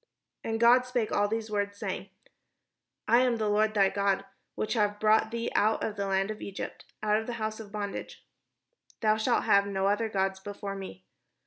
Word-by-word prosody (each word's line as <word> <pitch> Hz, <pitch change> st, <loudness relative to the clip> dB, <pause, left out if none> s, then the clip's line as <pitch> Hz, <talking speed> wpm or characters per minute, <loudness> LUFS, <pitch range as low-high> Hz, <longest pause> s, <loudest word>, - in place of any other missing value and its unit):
And 225 Hz, 0 st, -2 dB
God 245 Hz, +2 st, +5 dB
spake 245 Hz, -4 st, -1 dB
all 205 Hz, 0 st, +2 dB
these 220 Hz, 0 st, -3 dB
words, 205 Hz, -1 st, -1 dB
saying: 195 Hz, -2 st, -4 dB, 0.5 s
— -, -, -58 dB
"I 235 Hz, +3 st, +6 dB
am 250 Hz, -1 st, +3 dB
the 215 Hz, -1 st, -1 dB
Lord 215 Hz, +1 st, +2 dB
thy 195 Hz, -2 st, +5 dB
God, 200 Hz, -1 st, 0 dB, 0.3 s
which 215 Hz, -, -1 dB
have 210 Hz, -3 st, +1 dB
brought 220 Hz, +1 st, +4 dB
thee 230 Hz, 0 st, -3 dB
out 215 Hz, +1 st, +2 dB
of 210 Hz, -, -2 dB
the 200 Hz, -1 st, -2 dB
land 195 Hz, +1 st, +1 dB
of 215 Hz, -, -8 dB
Egypt, 195 Hz, -, -6 dB, 0.2 s
out 210 Hz, 0 st, +3 dB
of 220 Hz, -, -4 dB
the 245 Hz, -, -3 dB
house 220 Hz, -1 st, -3 dB
of 210 Hz, -2 st, -9 dB
bondage. 205 Hz, -1 st, -6 dB, 0.8 s
Thou 215 Hz, -1 st, +4 dB
shalt 235 Hz, +2 st, +1 dB
have 200 Hz, 0 st, +4 dB
no 195 Hz, -1 st, -1 dB
other 205 Hz, +3 st, +1 dB
gods 190 Hz, -2 st, -1 dB
before 200 Hz, 0 st, -6 dB
me. 95 Hz, -, -9 dB
210 Hz, 200 wpm, -29 LUFS, 200-220 Hz, 0.8 s, I